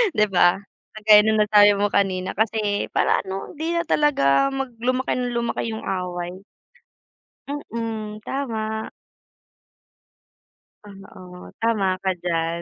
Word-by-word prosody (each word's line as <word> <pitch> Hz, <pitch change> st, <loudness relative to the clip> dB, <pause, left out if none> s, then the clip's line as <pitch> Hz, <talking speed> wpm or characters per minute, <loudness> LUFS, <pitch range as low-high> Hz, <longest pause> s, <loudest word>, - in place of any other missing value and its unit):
'di 210 Hz, 0 st, +3 dB
ba? 180 Hz, -1 st, +3 dB, 0.4 s
Kagaya 210 Hz, -1 st, +6 dB
ng 220 Hz, 0 st, +2 dB
nasabi 205 Hz, 0 st, +6 dB
mo 205 Hz, +1 st, +1 dB
kanina 190 Hz, -2 st, 0 dB
kasi 215 Hz, -1 st, 0 dB
para -, -, +2 dB
ano 190 Hz, 0 st, -6 dB
hindi 320 Hz, +3 st, -3 dB
na 340 Hz, -, +1 dB
talaga, 275 Hz, -, +3 dB
mag 270 Hz, -1 st, -3 dB
lumaki 255 Hz, +2 st, 0 dB
ng 250 Hz, -1 st, -2 dB
lumaki 235 Hz, -1 st, -2 dB
'yong 220 Hz, -, -6 dB
away. 180 Hz, 0 st, -4 dB, 1.0 s
Mm. 225 Hz, -6 st, -5 dB
Tama. 220 Hz, -5 st, -3 dB, 2.0 s
Oo, 185 Hz, -2 st, -12 dB
tama 205 Hz, -5 st, +1 dB
ka 190 Hz, -, +1 dB
diyan. 170 Hz, -1 st, -1 dB
210 Hz, 120 wpm, -22 LUFS, 190-230 Hz, 2.0 s, Kagaya